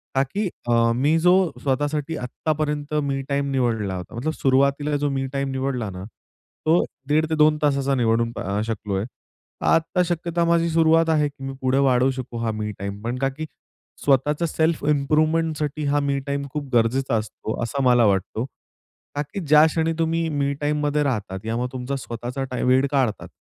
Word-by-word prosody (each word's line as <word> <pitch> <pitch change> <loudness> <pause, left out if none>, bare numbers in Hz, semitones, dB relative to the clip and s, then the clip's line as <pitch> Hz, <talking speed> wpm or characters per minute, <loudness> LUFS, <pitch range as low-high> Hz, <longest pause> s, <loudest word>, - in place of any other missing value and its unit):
का 135 - +4
की 195 +10 -2 0.2
अ, 115 -1 +3
मी 145 +6 +2
जो 180 +2 +5 0.3
स्वतःसाठी 145 +3 -1
आत्तापर्यंत 150 +3 -2
मी 135 -1 -1
टाईम 140 0 0
निवडला 115 -7 0
होता, 90 +4 -7
मतलब 155 +7 -2
सुरुवातीला 140 +2 +2
जो 145 0 0
मी 135 -1 -1
टाईम 140 -1 -1
निवडला 130 -4 -2
ना 90 0 -7 0.6
तो 165 +3 +4 0.2
दीड 155 +2 +3
ते 160 - +1
2 155 0 +4
तासाचा 140 -1 +2
निवडून 115 -1 +1
अ, 100 +3 -2
शकलोय. 105 -3 -2 0.6
आता 165 +3 +2
शक्यता 170 0 -1
माझी 170 0 +2
सुरुवात 165 0 +4
आहे, 150 -2 +3
की 140 -1 -14
मी 135 0 -4
पुढे 130 0 +1
वाढवू 130 -1 +3
शकू 130 -2 -6
हा 115 -1 -1
मी 105 -1 -3
टाईम. 100 +1 -5
पण 120 +2 -2
का 135 0 +1
की 150 +4 -6 0.6
स्वतःच 145 +3 +2
सेल्फ 160 0 +1
इम्प्रूव्हमेंट 155 +2 +1 0.3
हा 145 +1 +2
मी 140 -1 0
टाईम 140 0 -1
खूप 150 -2 -3
गरजेचा 120 +2 +2
असतो 110 0 -4
असं 135 +4 -2
मला 120 -2 +5
वाटतं. 100 +3 0 0.7
का 145 - 0
की 145 +7 -6
ज्या 150 +1 +7
क्षणी 160 +1 0
तुम्ही 165 0 +1
मी 140 -2 0
टाईममध्ये 150 0 +1
राहतात, 105 -8 -2
यामुळे 115 +3 -1
तुमचा 130 +2 -3
स्वतःचा 125 +1 -5
टा 125 - -3
वेळ 130 +2 +4
काढतात, 130 -7 0
140 Hz, 175 wpm, -23 LUFS, 120-150 Hz, 0.7 s, ज्या